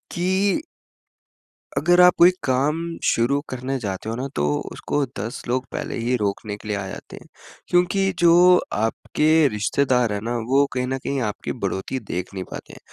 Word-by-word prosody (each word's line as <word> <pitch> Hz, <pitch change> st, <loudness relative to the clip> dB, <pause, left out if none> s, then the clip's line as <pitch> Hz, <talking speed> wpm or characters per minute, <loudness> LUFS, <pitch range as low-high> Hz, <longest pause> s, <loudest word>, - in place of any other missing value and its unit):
कि 190 Hz, +7 st, +1 dB, 1.2 s
अगर 175 Hz, +1 st, +4 dB
आप 180 Hz, 0 st, +7 dB
कोई 175 Hz, +2 st, +7 dB
काम 135 Hz, +3 st, +1 dB, 0.3 s
शुरू 125 Hz, +5 st, +2 dB
करने 130 Hz, +1 st, -3 dB
जाते 100 Hz, -1 st, -4 dB
हो 115 Hz, -, -2 dB
ना, 130 Hz, +3 st, -3 dB
तो 75 Hz, -, 0 dB, 0.3 s
उसको 145 Hz, -1 st, -2 dB
10 115 Hz, +6 st, -5 dB
लोग 130 Hz, +2 st, -1 dB
पहले -, -, -4 dB
ही 120 Hz, +2 st, 0 dB
रोकने 105 Hz, 0 st, -3 dB
के 105 Hz, -, -12 dB
लिए 105 Hz, -1 st, -1 dB
आ 95 Hz, -, -4 dB
जाते -, -, -9 dB
हैं, -, -, -13 dB, 0.4 s
क्योंकि 190 Hz, +2 st, +2 dB
जो 175 Hz, +1 st, +6 dB, 0.2 s
आपके 150 Hz, +8 st, +2 dB
रिश्तेदार 125 Hz, +1 st, +1 dB
हैं 100 Hz, -, -2 dB
ना, 120 Hz, +1 st, -2 dB
वो 135 Hz, +5 st, +2 dB
कहीं 125 Hz, 0 st, -1 dB
न 135 Hz, -, -2 dB
कहीं 135 Hz, +1 st, -3 dB
आपकी 105 Hz, -2 st, -3 dB
बढ़ोत्तरी 100 Hz, +7 st, -2 dB
देख 90 Hz, +2 st, -4 dB
नहीं 95 Hz, -1 st, -4 dB
पाते -, -, -8 dB
हैं, -, -, -12 dB
130 Hz, 175 wpm, -22 LUFS, 110-160 Hz, 1.2 s, आप